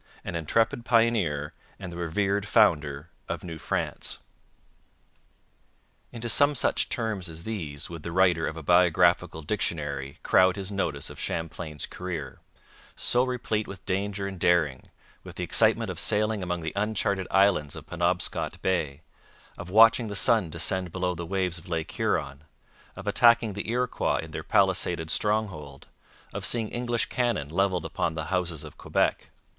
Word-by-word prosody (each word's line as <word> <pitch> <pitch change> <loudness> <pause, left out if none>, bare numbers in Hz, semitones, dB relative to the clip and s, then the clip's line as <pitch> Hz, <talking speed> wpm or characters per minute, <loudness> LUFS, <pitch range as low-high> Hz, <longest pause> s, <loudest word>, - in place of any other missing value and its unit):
An - - -5
intrepid 110 +9 +1
pioneer 110 -12 +2 0.2
and 90 -3 -7
the - - -7
revered 100 +4 0
founder 75 -2 +2 0.2
of - - -4
New 80 -3 -7
France. - - -3 1.9
Into 120 -1 -5
some 145 +5 +3
such - - +1
terms 110 -6 -3
as 80 +1 -9
these 80 -10 -5
would 85 -2 -8
the 85 - -6
writer 90 -2 +3
of 80 - -5
a 80 - -7
biographical 90 0 +3
dictionary 75 -7 -3
crowd 95 0 +4
his 100 0 -4
notice 80 -8 -2
of - - -11
Champlain's 80 -2 -4
career, 80 -8 -6 0.6
so 125 +1 +2
replete 120 -4 -2
with 95 -1 -10
danger 100 +1 -2
and 95 -2 -6
daring, 80 -8 +2 0.4
with - - -10
the - - -4
excitement - - +3
of - - -5
sailing 105 0 +1
among 90 -1 -2
the 80 -1 -4
uncharted 100 -2 0
islands 95 -7 +3
of - - -9
Penobscot - - -1
Bay, 80 -6 -1 0.5
of 90 - -8
watching 115 +3 +6
the 100 - -5
sun 105 -3 +4
descend 90 +2 -1
below 90 0 -1
the 85 -1 -6
waves 95 -2 -1
of 90 +3 -15
Lake 80 -2 -2
Huron, 70 +2 -1 0.5
of - - -9
attacking 115 -2 +4
the 100 +2 -5
Iroquois 125 +1 0
in - - -10
their - - -4
palisaded 80 0 +1
stronghold, 90 -10 -1 0.5
of - - -5
seeing 115 -3 +1
English 120 -1 -1
cannon 120 - -1
levelled 90 +1 0
upon 80 - -2
the 80 -1 -3
houses 85 -4 -1
of 75 - -12
Quebec. - - 0
90 Hz, 155 wpm, -27 LUFS, 80-105 Hz, 1.9 s, watching